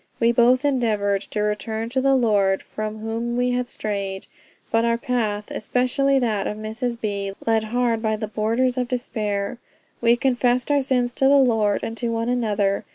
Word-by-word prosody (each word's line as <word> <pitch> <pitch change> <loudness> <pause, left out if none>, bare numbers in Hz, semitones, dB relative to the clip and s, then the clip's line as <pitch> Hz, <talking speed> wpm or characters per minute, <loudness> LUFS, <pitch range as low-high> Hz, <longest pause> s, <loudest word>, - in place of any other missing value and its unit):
We 230 0 +4
both 250 +3 +4
endeavored 215 -7 +1
to 210 - -2
return 220 +2 -2
to 260 +2 0
the 275 0 +3
Lord 205 -6 +2
from 215 0 -5
whom 230 +2 -3
we 250 0 +1
had 245 0 -1
strayed; 200 -2 -4 0.5
but 225 0 +3
our 235 0 +2
path, 225 -5 -2
especially 255 +4 +1
that 220 -6 0
of 210 - -4
Mrs. 230 +2 -4
B. 200 -2 -3
led 225 -1 +2
hard 235 0 0
by 220 -1 0
the 215 0 -4
borders 230 +4 0
of 250 - -1
despair.... 215 -4 -3 0.4
We 235 0 +5
confessed 250 +1 +1
our 285 -1 +3
sins 250 -2 0
to 270 - +1
the 280 +1 +6
Lord 225 -6 +2
and 225 - -4
to 235 0 -2
one 230 +1 -1
another. 210 -5 0
230 Hz, 180 wpm, -23 LUFS, 215-250 Hz, 0.5 s, the